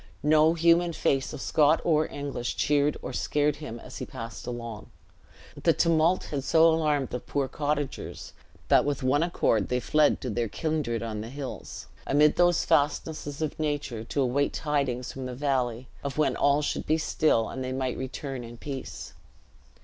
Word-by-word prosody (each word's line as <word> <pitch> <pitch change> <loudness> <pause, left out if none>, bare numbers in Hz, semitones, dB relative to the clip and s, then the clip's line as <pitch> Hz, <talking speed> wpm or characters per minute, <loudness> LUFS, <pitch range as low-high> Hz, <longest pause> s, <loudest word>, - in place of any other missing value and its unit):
No 155 +2 +5
human 170 +1 +3
face 135 -4 0
of - - -7
Scot 155 +1 +3
or 155 -2 +2
English 140 -4 -4
cheered 145 0 +2
or - - -5
scared 150 0 0
him 120 -6 -7
as - - -10
he - - -4
passed 115 0 -8
along. 115 -3 -6 0.7
The - - +4
tumult 165 +2 +3
had 140 -3 -2
so 165 +2 +5
alarmed 150 -5 +1
the 125 - -3
poor 140 +2 -2
cottagers, 145 0 -3 0.3
that - - +5
with 145 -2 -2
one 130 +3 +3
accord 115 - +1
they 125 - +1
fled 150 +4 +3
to 125 - -3
their 115 +2 -1
kindred 145 -4 -2
on 110 -2 -4
the 110 - -7
hills, 135 0 -7 0.2
amid 150 +2 +4
those 175 -1 +3
fastnesses 145 0 0
of 155 - -4
nature, 145 -7 -2
to 140 - -1
await 140 +3 +1
tidings 140 -5 -1
from 130 -1 -5
the 125 - -6
valley, 130 -3 -1 0.2
of 140 +1 -4
when 155 - +2
all 145 +1 +3
should - - -2
be 155 - +3
still, 155 -7 +2
and 130 - -5
they 130 - -3
might 130 -1 -2
return 130 0 -5
in 120 0 -10
peace. 135 0 -7
145 Hz, 175 wpm, -27 LUFS, 125-155 Hz, 0.7 s, No